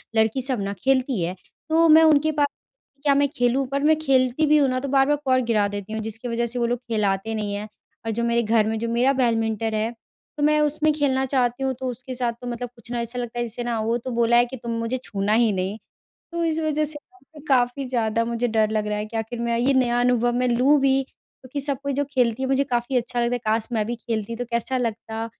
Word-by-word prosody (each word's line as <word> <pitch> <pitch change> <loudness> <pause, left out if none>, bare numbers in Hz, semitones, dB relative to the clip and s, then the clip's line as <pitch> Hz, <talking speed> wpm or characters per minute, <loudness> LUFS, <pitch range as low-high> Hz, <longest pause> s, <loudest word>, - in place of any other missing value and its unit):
लड़की 220 +4 +2
सब 255 -4 -1
न 200 0 -2
खेलती 260 -5 +1
है 170 +2 -2 0.3
तो 330 +1 +4
मैं 320 +1 +8
उनके 310 0 +4
पास 290 -1 +2 0.6
क्या 285 - +4
मैं 285 0 +3
खेलूँ? 250 +1 +1
पर 280 +2 -2
मैं 315 +1 +5
खेलती 265 0 +2
भी 305 0 +5
हूँ 285 -2 +4
न 255 0 0
तो 275 - -4
बार-बार 275 +2 +3
कॉर्क 255 -1 +3
गिरा 215 -3 +2
देती 205 +1 -6
हूँ 220 - -2
जिसकी 225 +3 -6
वज़ह 235 0 -1
से 240 +1 -4
वो 235 - +1
लोग 245 0 -1
खिलाते 210 -1 0
नहीं 210 -2 -3
हैं। 210 +1 -5 0.4
और 225 - -1
जो 235 +2 -2
मेरे 235 0 +2
घर 220 0 +2
में 220 0 -1
जो 230 - -2
मेरा 245 +4 +2
बैडमिंटन 225 -3 0
है 215 +2 0 0.5
तो 290 - -1
मैं 300 0 +4
उसमें 300 +1 +2
खेलना 265 -3 +1
चाहती 255 -1 0
हूँ 265 0 0
तो 260 - -3
उसके 255 +1 -7
साथ 240 -2 -1
तो 245 - -6
मतलब 245 0 -4
कुछ 235 +1 -13
न - - -2
ऐसा 235 +1 -3
लगता 240 0 -4
है 240 - 0
जैसे 235 +1 -5
ना 235 -2 -2
वो 230 +2 0
तो 245 +2 -6
बोला 235 0 +2
है 240 - +5
कि 260 +2 -8
तुम 235 -1 -6
मुझे 230 +3 -2
छूना 200 +1 -1
ही 230 -1 +4
नहीं 190 +3 -2 0.5
तो 340 0 -2
इस 320 -1 0
वज़ह 305 -1 0
से 305 +1 -13
काफ़ी 255 +1 +2
ज़्यादा 230 -2 0
मुझे 235 +1 -1
डर 220 -2 +2
लग 215 -1 -1
रहा 210 - -1
है 210 - -3
कि 225 +1 -5
आख़िर 225 +2 -4
मैं 235 0 0
ये 255 +4 +2
नया 245 -2 +2
अनुभव 245 -1 +2
मैं 250 +1 +1
लूँ 255 +5 +4
भी 270 0 +3
क्योंकि 265 +1 -10
सब 280 -2 -2
कोई 280 -1 -1
जो 285 - 0
खेलती 245 0 +1
है - - 0
मुझे 270 +1 +3
काफ़ी 250 -1 -1
अच्छा 245 0 -2
लगता 240 +1 +1
है - - -3
काश 220 +1 +1
मैं 220 -2 0
भी 240 +2 -3
खेलती 230 -1 -4
तो 245 +1 -4
कैसा 235 +2 -1
लगता? 225 -1 -3
240 Hz, 255 wpm, -23 LUFS, 225-270 Hz, 0.6 s, मैं